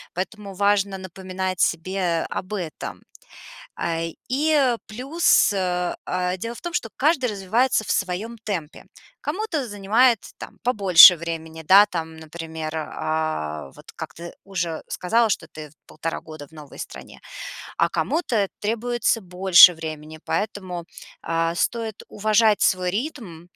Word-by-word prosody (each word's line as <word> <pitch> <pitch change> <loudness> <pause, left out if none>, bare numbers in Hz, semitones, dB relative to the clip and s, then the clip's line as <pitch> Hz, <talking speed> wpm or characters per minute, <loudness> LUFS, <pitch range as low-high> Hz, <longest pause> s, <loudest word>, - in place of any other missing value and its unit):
Поэтому 200 +2 -5
важно 200 0 +1
напоминать 185 0 -5
себе 175 0 0
об 185 - -5
этом. 175 -8 -5 0.8
А, 165 -1 -2 0.3
и 280 -3 +3
плюс, 265 +5 +2
э, 180 -2 -1
а, 180 0 -1
дело 230 +5 -5
в - - -11
том, 345 - -5
что 295 -10 -1
каждый 275 -3 +2
развивается 220 +5 +1
в - - -6
своём 200 +5 -2
темпе. 170 -7 -5 0.4
Кому-то 370 - -2
занимает, 220 +4 +3 0.2
там, - - -10
побольше 195 -7 +8
времени, 160 -1 -6
да, 200 +4 +8
там, 160 -3 -5
например, 160 0 -7
а, 155 - -3
вот - - -14
как - - -7
ты 170 +1 -9
уже 175 -5 -3
сказала, 225 +6 +1
что - - -1
ты 155 -1 -10
в - - -25
1,5 165 +1 -5
года 155 -2 -10
в - - -30
новой 150 -2 -12
стране, - - -9 0.6
а - - +3
кому-то 240 - 0
требуется 230 +1 0
больше 180 -1 +7
времени, 155 -1 -7
поэтому, 190 -5 -3 0.4
а, 165 0 -1
стоит 225 +3 -1
уважать 215 0 +2
свой 185 -2 +2
ритм 215 - -5
190 Hz, 135 wpm, -23 LUFS, 165-220 Hz, 0.8 s, побольше